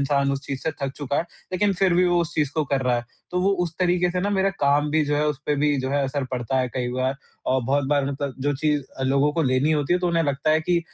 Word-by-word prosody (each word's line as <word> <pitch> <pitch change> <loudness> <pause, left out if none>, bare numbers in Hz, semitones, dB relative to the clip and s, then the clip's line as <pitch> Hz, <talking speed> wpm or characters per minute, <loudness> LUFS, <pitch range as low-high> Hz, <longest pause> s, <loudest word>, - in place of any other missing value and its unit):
इंसान 140 0 +1
उस 135 - -2
चीज़ 135 -2 -4
से 160 - 0
थक 135 -1 -1
चुका 145 -1 -2
है, - - +2 0.3
लेकिन 200 +2 +2
फिर 190 -1 +2
भी 180 +1 +4
वो 175 -1 +3
उस 170 - -3
चीज़ 150 -3 +1
को 155 -1 +1
कर 140 -1 0
रहा 125 -1 +2
है। 120 - -3 0.3
तो 180 - 0
वो 190 +2 +3
उस 170 -2 -3
तरीके 180 -1 +2
से 180 +1 -1
ना 200 +2 0
मेरा 195 -1 +2
काम 145 +1 +3
भी 155 0 +2
जो 145 0 0
है 150 +1 +1
उस 150 -2 -2
पे 150 - +2
भी 145 0 +2
जो 130 0 -3
है 140 0 +1
असर 135 +1 -2
पड़ता 130 +1 -1
है 130 -1 0
कई 125 -2 -1
बार 130 +1 0 0.4
और 130 0 +2
बहुत 140 +3 +1
बार 145 -1 +2
मतलब 140 -1 -4
जो 145 +1 +1
चीज़ 150 0 +1 0.3
लोगों 140 +2 +3
को 165 - 0
लेनी 130 +2 +2
होती 150 +1 +1
है 180 - +3
तो 180 - -1
उन्हें 170 -1 +2
लगता 145 +1 0
है 155 +1 +4
कि 170 +2 +1
145 Hz, 295 wpm, -24 LUFS, 135-170 Hz, 0.4 s, भी